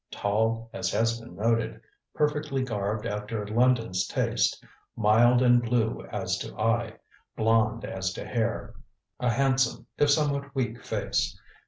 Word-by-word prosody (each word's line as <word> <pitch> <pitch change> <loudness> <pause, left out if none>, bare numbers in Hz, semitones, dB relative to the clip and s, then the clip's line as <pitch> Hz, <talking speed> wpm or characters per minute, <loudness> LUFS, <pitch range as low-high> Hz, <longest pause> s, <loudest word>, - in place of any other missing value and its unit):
Tall, 110 +2 0
as - - -2
has 115 +1 +1
been 115 - -12
noted, 115 +1 0 0.4
perfectly 150 -2 0
garbed 105 -3 -2
after 105 +1 -3
London's 115 -3 +2
taste, - - 0 0.3
mild 120 +3 +4
and 120 -1 +5
blue 115 -1 0
as - - -2
to - - -7
eye, 115 0 +1 0.4
blond 115 0 +2
as 95 -1 -3
to - - -6
hair. 115 -2 -2 0.5
A 125 - +1
handsome, 135 +2 +1
if 145 - +4
somewhat 145 -1 +1
weak 120 -3 -2
face. - - -1
115 Hz, 135 wpm, -27 LUFS, 110-125 Hz, 0.5 s, and